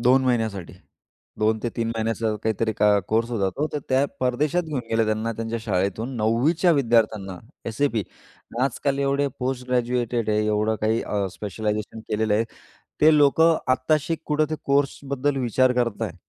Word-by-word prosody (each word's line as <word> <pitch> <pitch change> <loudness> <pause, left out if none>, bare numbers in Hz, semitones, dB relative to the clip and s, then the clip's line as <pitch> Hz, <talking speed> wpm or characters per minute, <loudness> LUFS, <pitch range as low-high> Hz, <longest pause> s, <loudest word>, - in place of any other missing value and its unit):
2 130 +2 +4
महिन्यासाठी. 110 -7 -1 0.7
2-3 110 +2 0
महिन्याचा 115 -1 -1
काहीतरी 110 0 0
को - - +5 0.2
कोर्स 115 +2 +1
होता, 100 -5 0
तो 145 +10 -2
तर - - -1
त्या 130 +1 +3 0.2
परदेशात 140 +7 +1
घेऊन 155 -5 -3
गेले 115 0 +2
त्यांना 110 +1 -1
त्यांच्या 115 +1 -4
शाळेतून 105 +4 -1
9वी 115 +7 +2
च्या 175 +1 +3
विद्यार्थ्यांना. 110 - +1 0.3
SAP 115 0 0 0.6
आजकाल 135 +1 0
एवढे 140 0 +1
पोस्ट 125 0 -3
ग्रॅज्युएटेड 120 -2 0
आहे, 105 0 +1
एवढं 105 +1 +1
काही 110 +1 +1
अ, 100 -2 -1
स्पेशलायझेशन 105 +2 -4
केलेलं 110 0 +1
आहे. 110 +2 +2 0.6
ते 155 0 +6
लोक 145 +1 +4
आत्ताशी 155 0 +2
कुठे 150 0 +1
ते 155 - 0
कोर्सबद्दल 140 0 0
विचार 130 0 +2
करताहेत. 115 -6 -1
115 Hz, 145 wpm, -24 LUFS, 110-135 Hz, 0.7 s, ते